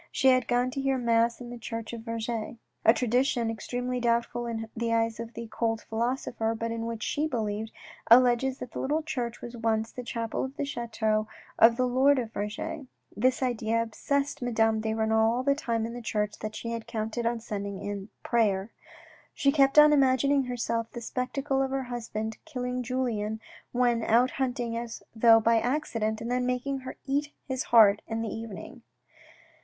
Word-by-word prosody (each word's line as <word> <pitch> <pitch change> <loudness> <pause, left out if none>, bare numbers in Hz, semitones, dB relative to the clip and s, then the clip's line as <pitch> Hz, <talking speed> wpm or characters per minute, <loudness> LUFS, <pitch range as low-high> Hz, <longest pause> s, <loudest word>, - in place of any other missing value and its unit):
She 265 - +4
had 255 0 +3
gone 245 +1 +1
to 275 - -3
hear 270 -1 +1
mass 235 -1 +2
in 240 -1 -8
the 245 - -7
church 230 0 -5
of 230 - -5
Vergy. 230 0 -4 0.3
A - - +8
tradition, 245 -1 +1
extremely 245 +3 -3
doubtful 235 0 0
in 225 -1 -4
the 230 0 -1
eyes 225 -1 +1
of 230 0 -7
the 230 - -5
cold 225 -1 -1
philosopher, 230 -1 -2
but 230 +1 -3
in 230 0 -3
which 230 -1 -4
she 300 +2 0
believed, 220 -4 -3 0.4
alleges 250 +2 +5
that 250 - -8
the - - -5
little 300 +4 0
church 245 -6 -4
was 240 0 -7
once 225 -1 0
the 250 - -6
chapel 230 -1 -3
of 265 +2 -6
the 285 - -1
chateau 220 -4 -1 0.3
of 230 +1 +7
the 255 - +2
Lord 265 +3 +4
of 230 -3 -3
Vergy. 215 +8 -4 0.3
This 255 +4 +2
idea 230 -2 0
obsessed 275 +6 -1
Madame 225 -2 +2
de 220 0 -1
Renal 220 0 +3
all 250 - -1
the 280 +1 +3
time 230 -6 -1
in 230 - -5
the 245 - -6
church 210 -2 -2
that 215 0 -5
she 230 - -5
had 230 -1 -5
counted 225 +1 -2
on 235 0 -1
spending 200 -3 -5
in 205 +1 -5
prayer. 210 -3 +1 0.6
She 275 - +3
kept 275 -1 +3
on 300 0 +9
imagin 270 -1 +3
ing 285 -1 +4
to 260 - -5
herself 230 -2 -2
the 240 - -8
spectacle 270 +3 -1
of 270 - 0
her 270 0 -1
husband 225 -3 -4
killing 250 0 -3
Julien 230 -4 -2 0.3
when 240 -2 +2
out 240 +4 +4
hunting 245 -3 -2
as 235 -1 -5
though 225 0 +7
by 230 +1 +3
accident, 230 -4 -1
and 235 +1 -3
then 250 0 +1
making 255 +2 -1
her 260 0 -8
eat 290 +2 -1
his 260 -2 -2
heart 210 -3 +6
in 225 0 -2
the 225 - -3
evening. 225 +2 -8
235 Hz, 190 wpm, -28 LUFS, 225-255 Hz, 0.6 s, on